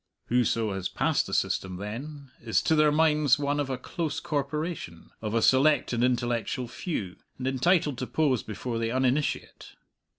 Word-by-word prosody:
Whoso 115 Hz, -3 st, +1 dB
has 95 Hz, -1 st, -3 dB
passed -, -, 0 dB
the -, -, -6 dB
system, 95 Hz, -1 st, -1 dB
then, 130 Hz, +8 st, -7 dB
is 110 Hz, -4 st, +1 dB
to -, -, +2 dB
their 150 Hz, -1 st, +5 dB
minds 150 Hz, -3 st, +4 dB
one 145 Hz, 0 st, -1 dB
of 145 Hz, -2 st, -1 dB
a 130 Hz, -, -2 dB
close 155 Hz, +4 st, -3 dB
corporation, 150 Hz, -, -4 dB
of 110 Hz, 0 st, -3 dB
a 115 Hz, -, +2 dB
select 135 Hz, 0 st, +4 dB
and 120 Hz, 0 st, +1 dB
intellectual 120 Hz, 0 st, 0 dB
few, 110 Hz, -, -4 dB, 0.2 s
and 130 Hz, -, -5 dB
entitled 145 Hz, +1 st, +2 dB
to 130 Hz, -, -3 dB
pose 140 Hz, -7 st, +1 dB
before 115 Hz, +3 st, -4 dB
the 115 Hz, 0 st, -1 dB
uninitiate. 130 Hz, +3 st, -1 dB
130 Hz, 165 wpm, -27 LUFS, 115-150 Hz, 0.2 s, their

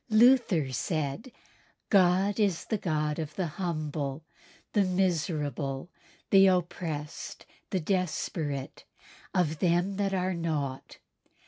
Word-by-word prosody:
Luther 215 Hz, -, +5 dB
said, 155 Hz, -, -2 dB, 0.6 s
"God 195 Hz, +2 st, +4 dB
is 195 Hz, -5 st, +1 dB
the 215 Hz, -, -1 dB
God 155 Hz, -3 st, -1 dB
of 155 Hz, -2 st, -5 dB
the 185 Hz, -, -1 dB
humble, 155 Hz, -4 st, -3 dB, 0.5 s
the 205 Hz, -, +4 dB
miserable, 160 Hz, -5 st, -1 dB, 0.4 s
the 195 Hz, -1 st, +8 dB
oppressed, 170 Hz, -4 st, -2 dB, 0.2 s
the 190 Hz, -, 0 dB
desperate, 160 Hz, -5 st, -2 dB, 0.5 s
of 160 Hz, -4 st, +1 dB
them 180 Hz, +2 st, +1 dB
that 195 Hz, -1 st, 0 dB
are 185 Hz, 0 st, 0 dB
naught. 150 Hz, -6 st, -3 dB
170 Hz, 105 wpm, -29 LUFS, 150-190 Hz, 0.6 s, the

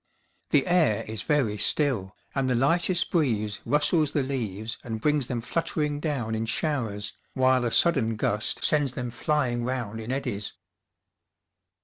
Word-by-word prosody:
The -, -, +3 dB
air 175 Hz, -, +3 dB
is 110 Hz, -1 st, -3 dB
very 120 Hz, -9 st, +1 dB
still, 120 Hz, -11 st, +1 dB, 0.2 s
and 135 Hz, -1 st, 0 dB
the 125 Hz, -, +2 dB
lightest 170 Hz, +8 st, +2 dB
breeze 110 Hz, -, 0 dB
rustles 150 Hz, 0 st, +2 dB
the 145 Hz, -, +1 dB
leaves 115 Hz, -5 st, -4 dB
and 110 Hz, -2 st, -4 dB
brings 150 Hz, 0 st, +1 dB
them 120 Hz, -2 st, -2 dB
fluttering 150 Hz, +2 st, -2 dB
down 140 Hz, -8 st, -2 dB
in 110 Hz, +1 st, -2 dB
showers, 115 Hz, -7 st, -2 dB, 0.2 s
while 130 Hz, -1 st, +3 dB
a -, -, +1 dB
sudden 130 Hz, -10 st, +3 dB
gust 105 Hz, 0 st, 0 dB
sends 145 Hz, -4 st, +2 dB
them 125 Hz, -2 st, -4 dB
flying 120 Hz, -1 st, 0 dB
round 120 Hz, -3 st, -3 dB
in 110 Hz, +2 st, -5 dB
eddies. 125 Hz, -7 st, -3 dB
125 Hz, 145 wpm, -26 LUFS, 110-150 Hz, 0.2 s, The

